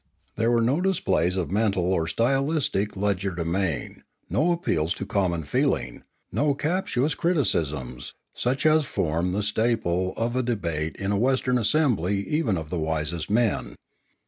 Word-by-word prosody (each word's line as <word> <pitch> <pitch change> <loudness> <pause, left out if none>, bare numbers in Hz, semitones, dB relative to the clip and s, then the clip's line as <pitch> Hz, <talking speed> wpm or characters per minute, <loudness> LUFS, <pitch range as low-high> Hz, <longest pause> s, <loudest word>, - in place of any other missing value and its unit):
There 115 +1 +1
were 120 -1 +3
no 135 +9 +2
displays 125 - +1
of 90 -2 -2
mental 100 -3 +1
or 80 -3 0
stylistic 130 - 0
legerdemain, 95 -4 -1 0.3
no 160 +6 +2
appeals 85 - 0
to 100 - -5
common 90 -5 0
feeling, 70 - -1 0.3
no 145 -1 +1
captious 155 -2 0
criticisms, 75 - -1 0.2
such 130 +4 -1
as 155 -1 +4
form 85 - -1
the 100 +3 -1
staple 105 -4 0
of 120 +2 -1
a 130 - +2
debate 85 -10 -2
in 95 0 -2
a 100 - +1
Western 125 0 +2
assembly 105 - +1
even 150 - +1
of 80 -1 -6
the 90 - -1
wisest 80 +1 -2
men. 110 +1 +1
100 Hz, 145 wpm, -25 LUFS, 85-130 Hz, 0.3 s, as